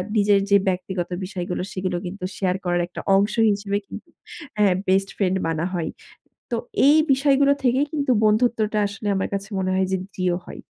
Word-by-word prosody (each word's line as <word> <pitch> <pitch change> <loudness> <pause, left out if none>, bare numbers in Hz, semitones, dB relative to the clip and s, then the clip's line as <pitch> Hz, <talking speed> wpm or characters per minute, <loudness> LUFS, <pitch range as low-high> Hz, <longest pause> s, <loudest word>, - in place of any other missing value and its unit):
নিজের 205 -1 +4
যে 200 - +6
ব্যক্তিগত 180 -1 -2 0.2
বিষয়গুলো 180 -2 -4
সেগুলো 185 -1 -2
কিন্তু 180 +1 -7
শেয়ার 185 -2 0
করার 175 0 +1
একটা 180 - -8
অংশ 200 +2 +2 0.2
হিসেবে 200 0 -1
কিন্তু - - -10 0.5
হ্যাঁ, 200 -3 +4
বেস্ট 195 +1 +2
ফ্রেন্ড 190 -2 +1
মানা 165 +1 -1
হয়। 170 -3 -2 0.6
তো 235 - 0 0.3
এই 300 - +6
বিষয়গুলো 275 +1 +4
থেকেই 260 +3 +2
কিন্তু 285 -3 0
বন্ধুত্বটা 215 0 +2
আসলে 205 +1 -7
আমার 190 - -1
কাছে 195 0 -4
মনে 185 - -1
হয় 190 0 +1
যে 190 - +1 0.2
দৃঢ় 180 -1 0
হয়। - - -10
195 Hz, 175 wpm, -23 LUFS, 185-215 Hz, 0.6 s, যে